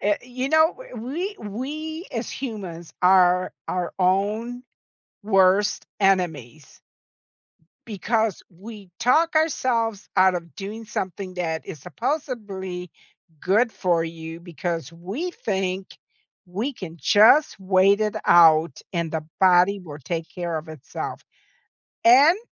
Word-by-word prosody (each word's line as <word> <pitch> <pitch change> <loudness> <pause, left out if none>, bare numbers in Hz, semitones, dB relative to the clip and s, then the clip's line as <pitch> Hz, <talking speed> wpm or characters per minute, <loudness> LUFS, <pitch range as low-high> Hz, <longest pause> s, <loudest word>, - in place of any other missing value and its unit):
Eh 205 0 +2
you 255 +2 -4
know, 315 +2 +4 0.2
w 235 - -7
we 340 - -4
we 305 - -6
as 230 0 -3
humans 190 - -7
are 180 0 +4 0.2
our 180 -1 -2
own 210 +7 0 0.6
worst 195 +1 +3
enemies 160 - -1 1.1
because 220 0 -1
we 200 +2 -12
talk 315 +8 +3
ourselves 235 -9 0
out 185 0 +5
of 170 -2 -6
doing 215 +3 -7
something 190 -2 -5
that 165 -3 -3
is 160 -8 -8
supposably 190 - -4 0.5
good 220 +5 +2
for 170 -3 +1
you 165 0 -8
because 170 -1 -5
we 200 - -5
think 190 - -3 0.6
we 215 +11 -3
can 175 -8 -9
just 225 +9 +5
wait 190 +2 +3
it 215 -1 0
out 160 -3 +5
and 170 -2 -2
the 160 -1 -3 0.2
body 185 +1 +5
will 155 -5 -10
take 165 +3 -3
care 170 -3 -3
of 155 +1 -10
itself. 155 -3 -7 0.8
And 280 - +7
195 Hz, 120 wpm, -23 LUFS, 175-230 Hz, 1.1 s, And